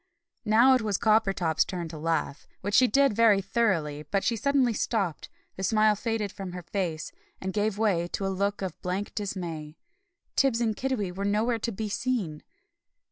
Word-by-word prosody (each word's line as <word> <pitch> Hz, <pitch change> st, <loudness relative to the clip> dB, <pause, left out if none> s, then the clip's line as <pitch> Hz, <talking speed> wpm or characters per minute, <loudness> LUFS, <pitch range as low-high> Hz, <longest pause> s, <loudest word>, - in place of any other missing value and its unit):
Now 235 Hz, +5 st, +6 dB
it 255 Hz, -, +3 dB
was 210 Hz, -3 st, 0 dB
Coppertop's 195 Hz, -7 st, +2 dB
turn 175 Hz, -3 st, -5 dB
to 160 Hz, -, -8 dB
laugh, 165 Hz, -3 st, -2 dB
which 205 Hz, +2 st, -3 dB
she 255 Hz, +4 st, +6 dB
did 275 Hz, +2 st, +3 dB
very 220 Hz, -3 st, +5 dB
thoroughly; 190 Hz, -8 st, 0 dB
but 195 Hz, +5 st, -1 dB
she 235 Hz, -, +1 dB
suddenly 265 Hz, 0 st, +2 dB
stopped, 200 Hz, -, -2 dB, 0.3 s
the -, -, -5 dB
smile 215 Hz, +1 st, +3 dB
faded 220 Hz, -2 st, -2 dB
from 190 Hz, -2 st, -7 dB
her 180 Hz, -1 st, -6 dB
face, 170 Hz, -3 st, -3 dB, 0.3 s
and 190 Hz, 0 st, -4 dB
gave 210 Hz, -1 st, 0 dB
way 195 Hz, -6 st, +1 dB
to 195 Hz, -, -2 dB
a -, -, 0 dB
look 200 Hz, +1 st, -1 dB
of 185 Hz, -4 st, -5 dB
blank 185 Hz, +3 st, -3 dB
dismay. 170 Hz, -7 st, -5 dB, 0.6 s
Tibbs 265 Hz, -4 st, +3 dB
and 225 Hz, -3 st, 0 dB
Kiddiwee 250 Hz, -8 st, -2 dB
were 195 Hz, -, -3 dB
nowhere 220 Hz, +4 st, +1 dB
to 230 Hz, -, -2 dB
be 215 Hz, +1 st, -4 dB
seen! 205 Hz, -9 st, -2 dB
205 Hz, 180 wpm, -27 LUFS, 180-225 Hz, 0.6 s, Now